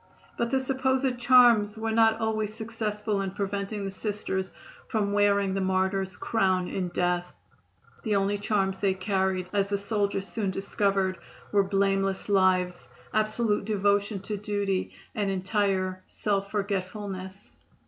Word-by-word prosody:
But 235 - -1
the 265 +1 +2
supposed 260 -1 0
charms 240 -4 +5
were 225 0 -2
not 225 0 +4
always 220 -2 -1
successful 215 -2 -2
in 195 - -2
preventing 200 +1 -3
the 195 - -3
Sisters 190 -2 -3 0.4
from 205 -2 0
wearing 200 -1 +3
the 195 - -1
martyr's 190 0 0
crown 185 -5 +1
in 185 -2 -2
death. 175 0 -1 0.7
The 215 -3 0
only 200 +1 +1
charms 195 -2 0
they 195 -2 +1
carried, 190 -1 0
as 200 -1 +2
the 200 0 0
soldiers 200 -1 -1
soon 210 -4 -2
discovered, 195 -1 0 0.3
were 205 - +5
blameless 195 0 0
lives, 185 -2 +2 0.3
absolute 215 -1 +1
devotion 205 -1 +1
to 210 +1 -4
duty 200 -2 -1 0.2
and 205 -2 -1
entire 190 -1 0
self 200 -1 -1
forgetfulness. 195 -1 -4
200 Hz, 135 wpm, -27 LUFS, 190-215 Hz, 0.7 s, charms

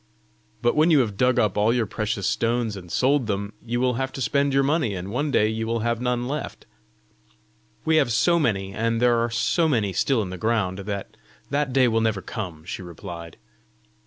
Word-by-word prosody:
"But 120 - +3
when 155 +3 +4
you 150 -5 +6
have 105 -5 -2
dug 125 +4 +2
up 105 -2 +2
all 105 +2 +3
your 120 -1 +1
precious 105 -1 -3
stones 115 -2 0
and 90 -3 -10
sold 135 -2 +2
them, 100 0 -2
you 120 +1 -2
will 125 0 +2
have 135 0 -2
to - - -6
spend 140 +5 +1
your 135 0 +3
money, 140 -7 +1
and 95 +2 -6
one 145 +6 -1
day 110 -6 +3
you 110 +1 -2
will 115 0 -1
have 115 +1 -1
none 125 -1 -1
left!" 150 +3 -5 1.2
"We 160 0 +3
have 120 - +3
so 170 +10 +3
many, 100 -9 0
and 115 +2 0
there 120 -1 +3
are 115 +1 0
so 115 +9 +1
many 110 -10 +1
still 110 +5 +1
in 90 - -6
the 90 - -7
ground, 105 -4 0
that 100 0 -5 0.4
that 145 -1 0
day 130 -1 +4
will 115 -1 +1
never 110 -4 0
come," 90 -9 -6
she 95 - -5
replied. 85 -1 -9
115 Hz, 210 wpm, -24 LUFS, 100-130 Hz, 1.2 s, you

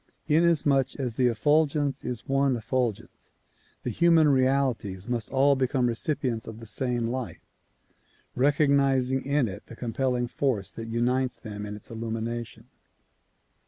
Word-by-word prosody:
In 155 +2 +4
asmuch 145 -6 +2
as 125 -4 -2
the 125 +2 +2
effulgence 145 +4 +1
is 125 -3 -5
one 135 -1 +2
effulgence, 120 -1 -3 0.5
the - - -2
human 165 -2 +4
realities 130 -8 +1
must 120 -3 -2
all 140 +1 +4
become 130 -1 +1
recipients 120 -1 -1
of 110 -1 -7
the 115 - -10
same 120 +3 -1
light, 125 0 -4 0.9
recognizing 135 -1 +2
in 140 -2 +1
it 100 0 -8
the 115 - -10
com 115 -1 -5
pelling 125 -2 0
force 120 -6 -1
that 115 0 -7
unites 125 +2 0
them 105 -2 -7
in 105 - -6
its 105 - -11
illumination. 115 0 -5
125 Hz, 140 wpm, -27 LUFS, 115-140 Hz, 0.9 s, In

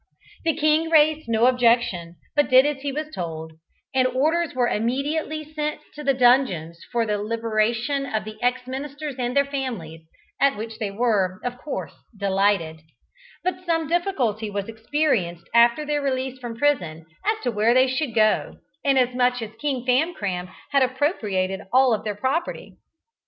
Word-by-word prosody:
The 325 -3 +2
king 310 +1 +2
raised 310 -3 +4
no 225 +1 +3
objection, 235 -9 +2 0.2
but 290 -1 +3
did 260 +1 +7
as 290 -2 -1
he 280 0 -2
was 305 +2 -5
told, 160 -2 -5 0.4
and 260 -1 +3
orders 310 +6 0
were 245 -1 +2
immediately 290 +8 -1
sent 300 0 -4
to 300 - -8
the 275 -1 +2
dungeons 240 - +2
for 235 -2 +1
the 210 -1 -1
liberation 230 +5 0
of 220 -4 -2
the 215 0 -7
ex 250 +1 0
ministers 280 +2 -5
and 250 +2 -1
their 280 - +5
families, 235 - -5 0.4
at 275 -5 +3
which 225 +1 -6
they 215 -3 -2
were, 200 -3 0
of 245 0 -4
course, 300 - -5 0.2
delighted; 195 -5 +1 0.6
but 365 0 -2
some 330 -3 0
difficulty 270 - 0
was 200 -1 -3
experienced 220 - -1
after 235 +5 +5
their 295 0 0
release 260 -1 -2
from 240 -2 -6
prison, 175 - 0 0.2
as 435 +1 0
to 245 - 0
where 220 +2 +2
they 255 0 +6
should 260 -1 -2
go 215 -1 +2
to, - - -26 0.2
inasmuch 250 -2 +2
as 215 - -7
King 265 -3 -2
Famcram 215 - 0 0.2
had 280 -1 +4
appropriated 220 - 0
all 255 -2 +5
their 210 -1 -3
property. 265 - -2
250 Hz, 160 wpm, -23 LUFS, 215-290 Hz, 0.6 s, did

